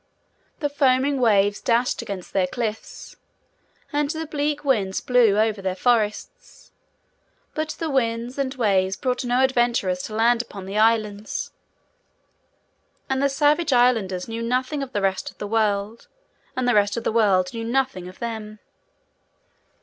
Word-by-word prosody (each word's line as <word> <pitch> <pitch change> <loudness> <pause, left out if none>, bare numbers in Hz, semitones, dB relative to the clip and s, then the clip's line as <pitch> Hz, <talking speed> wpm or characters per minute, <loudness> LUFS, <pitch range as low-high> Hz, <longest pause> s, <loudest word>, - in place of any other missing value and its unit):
The 295 - +1
foaming 275 -1 +2
waves 205 -3 +3
dashed 240 +1 +1
against 190 -3 -7
their 190 -2 +2
cliffs, 220 +1 -5 0.8
and 295 0 +1
the 320 +1 -3
bleak 295 -1 -2
winds 205 -8 +1
blew 240 -5 +3
over 215 -2 +1
their 190 -1 -2
forests; 245 - -1 0.8
but 310 -1 -2
the 330 - -3
winds 245 -2 -1
and 270 -1 0
waves 195 -5 +1
brought 250 -1 -1
no 250 +1 +2
adventurers 240 -8 +1
to 215 - -7
land 235 +1 +3
upon 200 -5 -10
the 195 +2 -6
Islands, 215 -2 0 1.6
and 265 0 +1
the 280 - +3
savage 295 +2 +2
Islanders 225 -7 +2
knew 230 0 -5
nothing 255 +5 -1
of 270 -2 -5
the 205 -5 -2
rest 190 -1 0
of - - -17
the - - -5
world, 210 0 -1 0.5
and 255 -1 0
the 245 - +3
rest 205 +1 +2
of 235 - -3
the - - 0
world 200 -4 +2
knew 230 -1 -4
nothing 240 -6 -1
of 185 - -11
them. 220 -2 -6
230 Hz, 150 wpm, -23 LUFS, 205-260 Hz, 1.6 s, waves